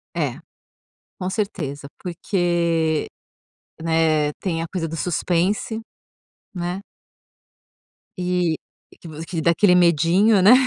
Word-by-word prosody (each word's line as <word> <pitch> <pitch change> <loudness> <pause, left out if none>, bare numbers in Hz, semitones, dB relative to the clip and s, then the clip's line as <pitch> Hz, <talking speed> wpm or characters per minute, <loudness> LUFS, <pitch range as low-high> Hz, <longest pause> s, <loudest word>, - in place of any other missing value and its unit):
É, - - -1 0.8
com 185 -1 -2
certeza. 155 -10 -3
Porque, 170 -3 0 0.7
né, 160 -2 +2
tem 165 -4 -2
a 165 - -3
coisa 170 -3 -2
do 165 - -5
suspense, 180 +6 0 0.7
né? 175 +1 -2 1.4
E 180 -3 0 0.4
que - - -11
vo 160 0 -7
que 170 -3 -2
dá 170 - +4
aquele 180 +2 +4
medinho, 180 +5 +4
né? 200 +5 +8
170 Hz, 105 wpm, -22 LUFS, 165-185 Hz, 1.4 s, né